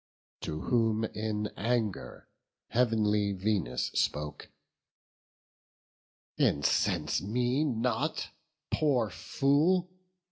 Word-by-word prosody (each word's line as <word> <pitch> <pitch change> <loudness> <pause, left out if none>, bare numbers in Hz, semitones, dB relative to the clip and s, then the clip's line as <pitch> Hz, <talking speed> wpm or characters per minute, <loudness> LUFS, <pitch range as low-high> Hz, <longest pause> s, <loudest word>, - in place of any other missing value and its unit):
To 80 0 -4
whom 115 -2 +1
in 105 -1 -2
anger 110 -2 -2 0.4
heav'nly 105 -4 +2
Venus 95 - -1
spoke: 75 0 -1 1.9
"Incense 90 +1 +2
me 125 +7 0
not, 130 +3 -1 0.4
poor 125 - +2
fool! 160 - +2
110 Hz, 70 wpm, -30 LUFS, 100-125 Hz, 1.9 s, heav'nly